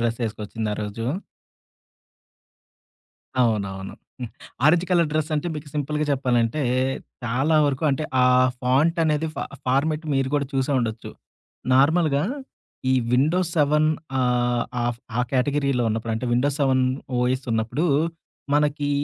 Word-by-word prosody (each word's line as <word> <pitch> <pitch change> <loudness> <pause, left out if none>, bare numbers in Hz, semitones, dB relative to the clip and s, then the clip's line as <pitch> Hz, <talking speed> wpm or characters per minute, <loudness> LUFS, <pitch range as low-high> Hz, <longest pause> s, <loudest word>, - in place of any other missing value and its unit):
డ్రెస్సేసుకొచ్చింది 115 -2 -3
ఆరోజు. 105 +2 -4 2.4
అవునవును. 100 -4 -1 0.3
హ్మ్. 120 - -5 0.3
ఆరెంజ్ 170 +3 +5
కలర్ 170 -3 +3
డ్రస్సంటే 155 +1 -1
మీకు 150 -1 -7
సింపుల్‌గా 150 +1 -1
చెప్పాలంటే, 125 +1 +1 0.6
చాలా 135 +7 +1
వరకు 140 +2 -1
అంటే 135 +3 -1 0.2
ఆ - - +6 0.4
ఫాంటనేది 155 +4 +2
ఫా - - -3 0.2
ఫార్మాట్ 150 +5 +1
మీరు 135 -1 +1
గూడా 140 -1 +1
చూసే 135 +1 0
ఉండొచ్చు. 110 -2 -3 0.6
నార్మల్‌గా 150 +1 +3 0.7
ఈ - - +4 0.2
విండోస్ 160 +7 +2
సెవెన్ 150 +1 +3 0.3
ఆహ్, 120 -1 +1 0.2
ఆఫ్ 120 -1 -2 0.2
ఆ - - +4
కేటగిరీలో 135 -1 +1
ఉన్నప్పుడంటే 110 +2 -2
విండోస్ 135 +4 +1
సెవెన్ 130 -2 +3 0.3
ఓఎస్ 130 +2 0
ఉన్నప్పుడు 115 +8 -1 0.7
మనకి 145 0 +1
135 Hz, 110 wpm, -23 LUFS, 120-150 Hz, 2.4 s, ఆ